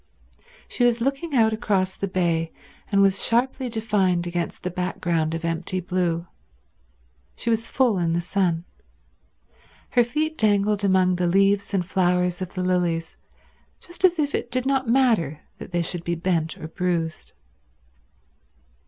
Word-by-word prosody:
She - - -1
was 240 -1 +3
looking 275 +5 -2
out 220 -2 +4
across 195 -4 0
the 200 - -3
bay, 170 -3 0 0.4
and 200 -1 +4
was 195 0 +3
sharply 255 +2 +1
defined 205 -6 +1
against 175 -1 -4
the 180 - -2
background 170 -3 -1
of 165 +1 -4
empty 170 +3 -2
blue. 175 -2 -1 1.1
She 235 - -2
was 225 0 -1
full 245 -7 +2
in 165 -1 0
the 170 - +1
sun. 175 -1 0 1.3
Her 245 - +4
feet 305 +6 -2
dangled 205 -1 +2
among 185 -2 +3
the 175 -1 +1
leaves 195 +3 +2
and 190 -3 0
flowers 180 -1 +1
of 185 -1 -6
the 185 - -2
lilies 175 -3 0 0.6
just 350 +2 -11
as 360 -2 +5
if 290 -2 0
it - - -2
did 255 +1 -1
not 270 -3 0
matter 225 - +2 0.2
that - - -9
they 175 -1 0
should 170 0 -3
be 170 0 -1
bent 165 -2 -1
or 155 - -7
bruised. 165 -2 -3
185 Hz, 155 wpm, -24 LUFS, 175-230 Hz, 1.3 s, as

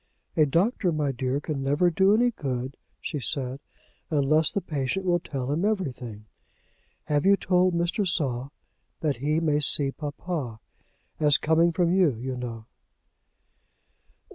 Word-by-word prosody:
"A 155 -2 +4
doctor, 180 - +1
my 150 -3 0
dear, 130 +2 -2
can 150 -2 -4
never 145 +6 +2
do 190 +4 +4
any 245 +2 +3
good," 130 - -4 0.2
she 150 - -4
said, 135 -1 -2 0.5
"unless 155 +1 +3
the - - -1
patient 160 +2 -3
will 175 -1 +2
tell 135 -5 -4
him 160 +5 0
everything. 130 - -3 0.8
Have 145 -1 0
you 200 +1 +5
told 180 -1 +2
Mr. 175 +4 0
Saul 135 -6 -1 0.5
that 150 -5 0
he 150 +5 0
may 150 -3 +1
see 140 -1 +3
papa, 145 -5 -5 0.6
as 150 -1 +4
coming 165 +2 +3
from 175 0 +1
you, 180 -9 +3
you 130 +3 -4
know?" 115 -3 -6
150 Hz, 140 wpm, -26 LUFS, 135-175 Hz, 0.8 s, you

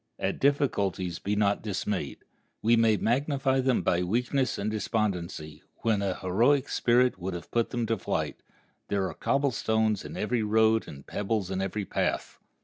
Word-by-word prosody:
At - - -2
difficulties 100 -11 +1
be 105 +1 -1
not 100 -1 +2
dismayed. 100 -6 -3 0.4
We 115 +2 +5
may 115 -2 +4
magnify 135 +3 +1
them 130 -2 +2
by 85 - +2
weakness 125 +8 0
and 105 +2 -2
despondency, 90 -8 -2 0.2
when 110 -3 +2
an 95 -2 -1
heroic 120 +10 +2
spirit 120 -3 +2
would 95 0 -4
have 85 - -8
put 115 -1 +1
them 120 -2 -1
to 110 -2 -1
flight. - - -2 0.5
There 100 -2 0
are - - -5
cobble 140 0 +1
stones 110 -2 +1
in - - -8
every 115 +2 0
road 110 +1 +3
and 70 -1 -10
pebbles 105 -2 -2
in 95 0 -1
every 95 +1 -2
path. - - -2
110 Hz, 165 wpm, -28 LUFS, 95-120 Hz, 0.5 s, We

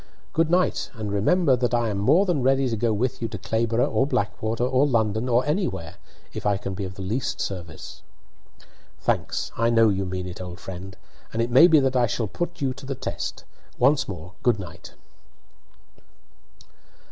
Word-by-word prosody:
"Good 165 0 +2
night, 180 +2 +1
and 110 -3 -4
remember 135 - +3
that 125 0 0
I 120 -1 +1
am 100 -2 -2
more 165 - +4
than 175 -7 0
ready 135 +1 +3
to 115 - -1
go 115 +1 +1
with 115 +4 -1
you 115 - -1
to 110 - -6
Clayborough 115 +4 0
or 120 +5 +2
Blackwater 110 0 -1
or 130 +3 +3
London 110 -1 +1
or 120 +1 +3
anywhere, 145 - -2 0.4
if - - -5
I 100 -1 +2
can 95 -1 -5
be 100 +1 -4
of 95 0 -7
the 95 - -7
least 115 +8 -2
service." 85 -5 -6 1.0
"Thanks! - - -1
I 115 0 +2
know 115 -1 +5
you 95 -1 -1
mean 90 0 -4
it, 90 0 -7
old 90 -1 -7
friend, 95 +1 -8 0.3
and 115 - -4
it 115 +1 0
may 135 +8 +8
be 160 -3 +6
that 135 -1 +1
I 125 -1 +4
shall 115 0 -1
put 175 - -4
you 135 -2 0
to 130 - -11
the 135 - -2
test. - - -5 0.3
Once 135 +3 +3
more, 90 -1 -7
good 120 -3 +3
night." 85 -4 -10
115 Hz, 190 wpm, -24 LUFS, 100-130 Hz, 1.0 s, may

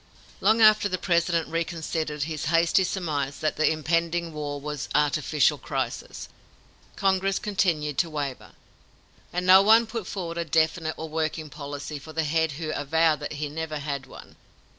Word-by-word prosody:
Long 220 +3 +3
after 215 -1 +6
the 185 - -1
President 170 -2 +1
reconsidered 160 -2 -2
his 155 -1 -4
hasty 170 +4 +3
surmise 150 -7 -2
that 155 - -1
the 155 - +3
impending 165 +1 -1
war 145 -1 -4
was 150 0 -5
"artificial 150 -1 +2
crisis," - - -4 0.7
Congress 195 0 +1
continued 165 -9 0
to 170 - +1
waver, 145 -4 -5 0.8
and 180 +1 -2
no 185 +1 +8
one 220 +3 +6
put 220 -3 -5
forward 170 -3 -4
a - - 0
definite 160 0 0
and 160 -1 -6
working 155 -1 -2
policy 145 0 -6
for 155 +3 -11
the 160 +1 0
head 160 0 +1
who 155 +1 -4
avowed 155 +1 +2
that - - -5
he 150 0 -3
never 155 +1 -4
had 140 -2 -4
one. - - -13
160 Hz, 160 wpm, -26 LUFS, 150-170 Hz, 0.8 s, no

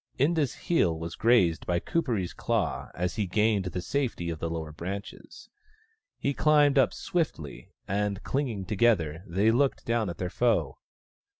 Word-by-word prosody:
Inda's 145 0 +1
heel 90 - +1
was 85 +1 -5
grazed 110 -9 +3
by 85 -1 +1
Kuperee's 115 - -1
claw - - -1
as 90 +4 -2
he 105 -3 0
gained 105 +1 +2
the 90 0 -4
safety 115 -9 -2
of 80 - -6
the 85 - -2
lower 80 -2 -4
branches. 95 +6 -7 0.7
He. 140 - -1
climbed 145 -1 +4
up 130 - +4
swiftly, 150 - -3 0.2
and, 100 +1 -1
clinging 120 -9 -2
together, 90 -6 +1
they 100 +6 +2
looked 135 +3 +1
down 115 -4 0
at 85 - -6
their 90 -1 -3
foe. 100 - +1
100 Hz, 155 wpm, -28 LUFS, 85-125 Hz, 0.7 s, climbed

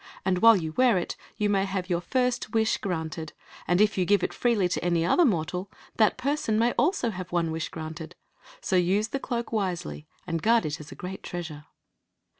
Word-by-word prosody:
And 185 -1 +2
while 230 +2 +8
you 160 -3 -3
wear 245 +2 +4
it 175 - -3 0.2
you 210 - +1
may 195 -1 +2
have 190 -2 -3
your 175 -2 0
first 250 0 -1
wish 220 -1 +2
granted; 160 -4 -4 0.3
and 175 +1 +3
if 210 -2 +3
you 180 - +2
give 200 0 +3
it - - -1
freely 230 -7 +2
to 180 - -2
any 170 -1 +1
other 345 - +4
mor 175 - +2
tal, 180 +3 -5 0.3
that 215 -2 +4
person 255 -4 0
may 235 +2 +3
also 295 - +1
have 185 -2 -7
one 170 -2 0
wish 160 0 -3
granted. 160 +1 -7 0.5
So 190 - -1
use 190 +5 +2
the 275 - -2
cloak^ 235 -3 -3
wisely, 180 -7 -3 0.2
and 165 -3 -2
guard 230 +1 +3
it 150 -1 -3
as 150 -1 -11
a - - -8
great 185 +1 -7
treasure. 160 -4 -6
185 Hz, 210 wpm, -27 LUFS, 170-225 Hz, 0.5 s, while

